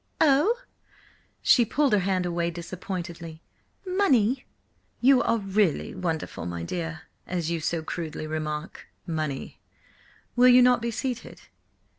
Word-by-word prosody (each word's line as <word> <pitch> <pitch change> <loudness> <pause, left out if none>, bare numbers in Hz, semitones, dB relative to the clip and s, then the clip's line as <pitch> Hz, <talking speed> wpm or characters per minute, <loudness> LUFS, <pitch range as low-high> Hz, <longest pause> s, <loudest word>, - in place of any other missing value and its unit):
"Oh!" 315 - +4 0.9
She 245 - +6
pulled 275 +2 +1
her 210 - +5
hand 185 -1 0
away 170 -1 0
disappointedly. 170 -1 -6 0.4
"Money!" 270 - +2 0.5
"You 260 0 +5
are 230 - +2
really 195 -4 0
wonderful, 160 - -3
my 85 -1 -4
dear. 165 - -4 0.2
As 170 -2 -2
you 170 - -1
so 160 +1 -2
crudely 160 -1 -5
remark–money! 155 -1 -5 0.8
Will 250 +1 +6
you 250 0 +8
not 250 -1 +4
be 235 - -1
seated?" 245 +1 -4
180 Hz, 120 wpm, -26 LUFS, 165-245 Hz, 0.9 s, you